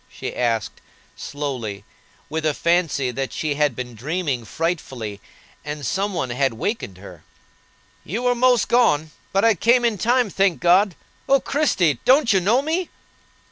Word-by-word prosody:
she - - -7
asked, 115 -3 -1 0.3
slowly, 125 -9 -5 0.4
with 160 +1 -3
a 155 -2 +1
fancy 165 -7 +1
that 130 0 -4
she 155 -2 -2
had 145 -3 +1
been 125 0 -6
dreaming 140 - -2
frightfully, 120 - -4 0.4
and 150 -1 -5
some 195 +9 -1
one 130 -7 -2
had 130 -1 0
wakened 115 - -3
her. 90 -4 -13 0.8
"You 220 +10 -4
were 245 0 +3
most 245 -1 +3
gone; 160 -11 +2 0.2
but 195 +3 +2
I 225 - +6
came 240 +6 +3
in 220 -4 0
time, 240 -2 +2
thank 195 -3 +1
God! 180 +2 +4 0.3
O 275 0 +5
Christie! 185 - +1
don't 260 -3 +4
you 190 - +4
know 225 +9 +2
me?" 330 +4 -1
165 Hz, 155 wpm, -22 LUFS, -, 0.8 s, I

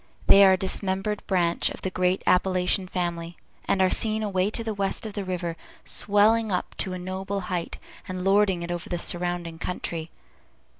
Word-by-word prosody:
They 200 - +8
are 190 -1 +7
a - - +2
dismembered 195 +2 -1
branch 175 -3 +1
of - - -10
the 190 - -2
great 185 0 0
Appalachian 185 +1 +2
family, 170 -2 -4 0.3
and 195 -1 +2
are 185 - +3
seen 220 -1 +2
away 195 -2 0
to 230 +2 -4
the 220 -1 -3
west 200 +1 -1
of 215 - -6
the 205 -1 -4
river, 180 -3 -3 0.3
swelling 215 +2 +2
up 180 - -2
to 190 - 0
a - - -4
noble 190 +2 -4
height, 170 -2 -3 0.3
and 185 -1 -5
lording 195 -2 +2
it 170 - -5
over 175 0 -5
the 175 - -2
surrounding 175 -1 -1
country. 165 -2 -4
185 Hz, 185 wpm, -25 LUFS, 175-200 Hz, 0.3 s, They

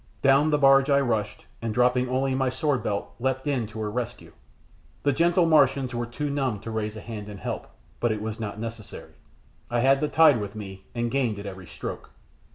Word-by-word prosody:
Down 140 +3 +5
the 150 - +3
barge 135 0 +5
I 140 0 +5
rushed, 115 -6 -1 0.2
and 115 -2 -3
dropping 125 0 +3
only 130 +1 +1
my 130 0 +1
swordbelt, 125 -6 -1
leapt 130 +1 -1
in 135 -6 0
to 110 +1 -9
her 105 -1 -2
rescue. 120 +1 -5 0.7
The 145 - +3
gentle 170 +4 +3
Martians 135 -5 +3
were 120 0 -2
too 145 +5 -3
numb 135 -7 -1
to 115 - -6
raise 110 -1 -3
a 110 - -7
hand 105 -2 -7
in 105 - -8
help; - - -5 0.3
but 120 - +1
it 110 - -2
was 110 +1 -5
not 105 -1 -5
necessary. 115 -2 -8 0.6
I 120 0 +1
had 135 +2 +4
the 150 - +2
tide 150 -7 +5
with 100 +1 -6
me, 95 -2 -8
and 120 0 -1
gained 125 -6 0
at 100 - -7
every 95 -2 -8
stroke. - - -7
120 Hz, 205 wpm, -26 LUFS, 110-135 Hz, 0.7 s, Down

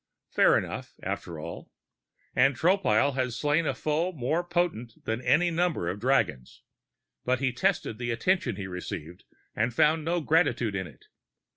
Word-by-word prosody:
Fair - - +5
enough, - - -5
after 85 -3 -4
all. 85 +2 -8 0.7
And 135 +2 +4
Tropile 145 - +3
had 130 -2 -1
slain 150 +5 +1
a 135 - 0
foe 155 +6 0
more 155 +2 -1
potent 175 -10 -1
than 110 +2 -2
any 175 +6 +3
number 165 - 0
of 95 +3 -4
dragons. 115 - 0 0.6
But 130 0 +1
he 130 -2 0
tested 175 - 0
the 120 -1 -3
attention 180 - +1
he 100 -1 -5
received 90 -2 -7 0.3
and 120 - +1
found 155 +3 +3
no 170 +3 0
gratitude 150 - +2
in 95 -2 -3
it. 70 -7 -17
130 Hz, 155 wpm, -28 LUFS, 110-165 Hz, 0.7 s, Fair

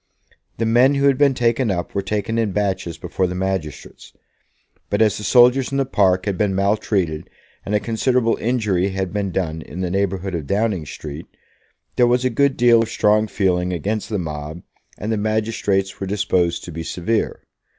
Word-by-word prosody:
The 115 - 0
men 125 +5 +4
who 140 0 +1
had 140 -1 +3
been 140 -2 +4
taken 120 0 +1
up 90 -3 -3
were 100 - 0
taken 105 +3 -2
in 110 -4 0
batches 95 -4 -2
before 95 - -2
the 90 - -5
magistrates; 95 -5 -5 0.8
but 100 - 0
as 110 -3 +3
the - - -7
soldiers 125 +4 +4
in 135 - -1
the 135 - +1
park 95 -7 +2
had 100 -3 -2
been 100 -2 +1
maltreated, 100 -5 0 0.4
and 105 - 0
a - - +3
considerable 115 +2 +1
injury 105 -6 0
had 95 -1 -3
been 100 -2 -1
done 80 -3 -2
in 85 +3 -8
the 90 -1 -2
neighbourhood 95 -1 -1
of 80 -5 -4
Downing 100 -6 0
Street, 75 +3 -8 0.7
there 125 - +5
was 125 +1 +2
a 130 - +2
good 140 +3 +2
deal 120 -1 +5
of 115 - -2
strong 105 0 +2
feeling 90 -4 0
against 105 +5 -3
the 105 - -1
mob, 75 -1 -6 0.3
and 105 +3 -4
the 110 - 0
magistrates 105 -2 -1
were 95 - -4
disposed 95 -4 0
to 85 - -8
be 80 +1 -6
severe. 90 +7 -2
100 Hz, 190 wpm, -20 LUFS, 90-115 Hz, 0.8 s, there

